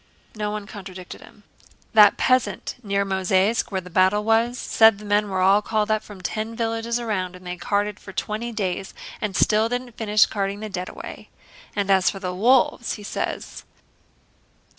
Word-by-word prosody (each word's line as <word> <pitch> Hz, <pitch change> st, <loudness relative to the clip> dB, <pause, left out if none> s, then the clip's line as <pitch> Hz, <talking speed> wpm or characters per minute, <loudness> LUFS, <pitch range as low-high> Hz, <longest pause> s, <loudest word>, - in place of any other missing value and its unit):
No 210 Hz, -1 st, -3 dB
one 210 Hz, -1 st, -4 dB
contradicted 190 Hz, -3 st, -10 dB
him. 210 Hz, -, -17 dB, 0.5 s
"That 210 Hz, -2 st, +7 dB
peasant 255 Hz, -6 st, +1 dB
near 200 Hz, -2 st, 0 dB
Mozháysk 190 Hz, +3 st, +1 dB
where 190 Hz, -1 st, -1 dB
the 180 Hz, 0 st, -13 dB
battle 190 Hz, +4 st, +3 dB
was 225 Hz, +3 st, +2 dB
said 220 Hz, -4 st, +4 dB
the 210 Hz, -, -11 dB
men 205 Hz, 0 st, +1 dB
were 190 Hz, -1 st, -1 dB
all 195 Hz, +3 st, +5 dB
called 215 Hz, 0 st, 0 dB
up 215 Hz, 0 st, +1 dB
from 200 Hz, -3 st, -12 dB
ten 220 Hz, +4 st, -3 dB
villages 230 Hz, +1 st, -1 dB
around 190 Hz, -6 st, -2 dB
and 180 Hz, 0 st, -14 dB
they 180 Hz, 0 st, -4 dB
carted 205 Hz, +3 st, -1 dB
for 190 Hz, -, -11 dB
twenty 215 Hz, +4 st, -3 dB
days 195 Hz, -3 st, -3 dB, 0.3 s
and 205 Hz, -3 st, -2 dB
still 215 Hz, +3 st, +3 dB
didn't 245 Hz, 0 st, -3 dB
finish 210 Hz, -2 st, +4 dB
carting 200 Hz, -1 st, -3 dB
the 215 Hz, 0 st, -6 dB
dead 185 Hz, -2 st, -4 dB
away. -, -, -9 dB, 0.5 s
And 200 Hz, -1 st, 0 dB
as 190 Hz, -1 st, +4 dB
for -, -, -5 dB
the 180 Hz, -2 st, -4 dB
wolves, 235 Hz, +4 st, +2 dB
he 210 Hz, -, -8 dB
says..." -, -, -4 dB
210 Hz, 180 wpm, -23 LUFS, 190-220 Hz, 0.5 s, That